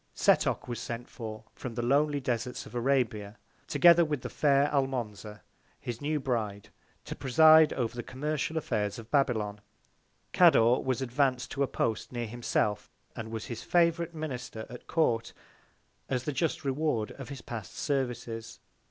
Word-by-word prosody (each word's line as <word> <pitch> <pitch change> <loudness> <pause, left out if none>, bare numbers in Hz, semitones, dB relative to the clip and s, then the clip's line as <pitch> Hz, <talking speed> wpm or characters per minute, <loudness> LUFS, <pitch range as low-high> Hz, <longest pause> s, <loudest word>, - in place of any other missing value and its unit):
Setoc - - +2
was 120 -1 -4
sent 120 +1 -5
for 110 -2 -8
from 120 -3 -7
the 120 - -2
lonely 145 +3 +2
Desarts 125 -1 -3
of - - -13
Arabia, 120 -5 0 0.3
together 170 -1 +6
with 150 -5 -2
the - - -6
fair 140 -1 +3
Almonza, 110 -7 -2 0.4
his 120 -1 -6
new 150 +1 0
Bride, 110 -7 -3 0.4
to - - -6
preside 155 +4 +6
over 120 -1 -2
the 120 - -3
commercial 150 +5 -3
Affairs 105 -9 -1
of 115 0 -11
Babylon. 110 -8 +1 0.7
Cador 120 +2 +6
was 130 -1 -1
advanc'd 130 0 0
to 140 - -3
a 140 - +3
Post 110 -3 -2
near 120 -1 -3
himself, 105 -2 -1 0.3
and 110 -2 -6
was 110 -1 -5
his 120 - -6
Favourite 170 -1 +1
Minister 125 -7 -5
at 125 - -10
Court, 115 -9 +1 0.8
as 125 -2 -1
the 150 - -2
just 145 +2 -1
Reward 135 -5 0
of 135 -1 -9
his 140 -4 -8
past 110 -5 -7
Services. 120 -5 -3
125 Hz, 155 wpm, -29 LUFS, 115-140 Hz, 0.8 s, together